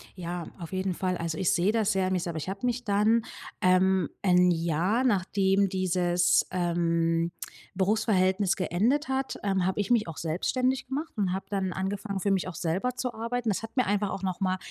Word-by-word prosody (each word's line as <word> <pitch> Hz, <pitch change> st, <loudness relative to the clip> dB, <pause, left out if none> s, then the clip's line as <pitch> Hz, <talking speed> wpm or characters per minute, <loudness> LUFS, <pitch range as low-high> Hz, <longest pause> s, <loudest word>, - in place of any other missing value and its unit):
Ja, 175 Hz, -2 st, -5 dB
auf 170 Hz, +1 st, -8 dB
jeden 185 Hz, 0 st, -1 dB
Fall. 185 Hz, 0 st, -1 dB
Also, 165 Hz, -2 st, -3 dB
ich 185 Hz, -, +2 dB
sehe 180 Hz, +4 st, +2 dB
das 220 Hz, -2 st, +1 dB
sehr 190 Hz, -1 st, +1 dB
an 190 Hz, -, 0 dB
mir 185 Hz, -, +1 dB
selber. 170 Hz, -2 st, -4 dB
Ich 160 Hz, -, -4 dB
habe 195 Hz, +5 st, -4 dB
mich 245 Hz, 0 st, -1 dB
dann 215 Hz, +2 st, +3 dB, 0.4 s
ähm, 185 Hz, -1 st, +3 dB
1 180 Hz, -1 st, +4 dB
Jahr, 170 Hz, +8 st, +1 dB
nachdem 195 Hz, -3 st, +2 dB
dieses, 180 Hz, -1 st, +2 dB
ähm, 170 Hz, -1 st, +1 dB, 0.4 s
Berufsverhältnis 195 Hz, -1 st, +2 dB
geendet 225 Hz, -, 0 dB
hat, 265 Hz, 0 st, -2 dB
ähm, 195 Hz, -3 st, +1 dB
habe 190 Hz, +2 st, -1 dB
ich 200 Hz, -, -3 dB
mich 230 Hz, -5 st, +3 dB
auch 165 Hz, -, -6 dB
selbstständig 250 Hz, +11 st, -1 dB
gemacht 295 Hz, +5 st, -4 dB
und 190 Hz, -3 st, 0 dB
habe 190 Hz, -, -4 dB
dann 190 Hz, -3 st, -1 dB
angefangen, 195 Hz, +1 st, -3 dB
für 200 Hz, -, +1 dB
mich 190 Hz, -2 st, 0 dB
auch 185 Hz, -, -6 dB
selber 185 Hz, +11 st, -1 dB
zu 250 Hz, -1 st, -3 dB
arbeiten. 230 Hz, +1 st, -2 dB
Das 200 Hz, -, 0 dB
hat 225 Hz, -, -8 dB
mir 255 Hz, -, +2 dB
einfach 205 Hz, 0 st, 0 dB
auch 195 Hz, -, -5 dB
noch 185 Hz, -2 st, -2 dB
mal 185 Hz, -1 st, 0 dB
190 Hz, 200 wpm, -28 LUFS, 180-215 Hz, 0.4 s, 1